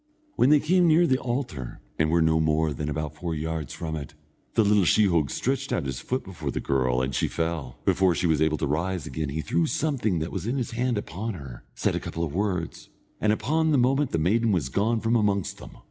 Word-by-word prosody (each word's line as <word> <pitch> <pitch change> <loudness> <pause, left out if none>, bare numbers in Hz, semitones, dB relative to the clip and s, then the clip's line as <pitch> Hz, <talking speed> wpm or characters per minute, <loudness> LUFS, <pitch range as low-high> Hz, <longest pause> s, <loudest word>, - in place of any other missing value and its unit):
When 130 - +4
they 150 0 +6
came 175 +4 +3
near 165 +2 +5
the 130 -4 +2
altar, 120 - -4 0.2
and 80 - +3
were 85 0 +3
no 80 0 +3
more 80 0 +1
than 75 +2 -4
about 75 0 -3
four 85 +1 -4
yards 80 0 -3
from 80 -2 -4
it, 75 -3 -7 0.4
the 110 - +5
little 105 -1 +4
sheehogue 85 -6 +3
stretched - - -2
out - - 0
his 65 -2 -3
foot 130 +1 -2
before 80 -6 -6
the - - -2
girl, 65 -2 +1
and 65 +1 -2
she - - +1
fell. 80 -6 -3
Before 95 -2 +3
she - - -1
was 80 -3 +2
able 80 0 +2
to - - -1
rise 85 +3 -1
again 75 +2 -3
he 75 +3 -3
threw 85 +1 0
something 125 - 0
that 80 +1 -3
was - - -4
in 125 +4 -1
his 125 -2 -2
hand 120 0 0
upon 105 +2 -4
her, 65 -7 -10
said - - 0
a - - 0
couple 85 - -4
of 75 -4 -3
words, 90 -3 -2 0.3
and 105 - +2
upon 155 +10 +1
the 150 - +3
moment 135 +3 +2
the - - -1
maiden 110 +8 +2
was 80 -9 0
gone 110 - +1
from 115 +1 +1
amongst 100 -4 0
them. - - -12
85 Hz, 235 wpm, -26 LUFS, 75-115 Hz, 0.4 s, they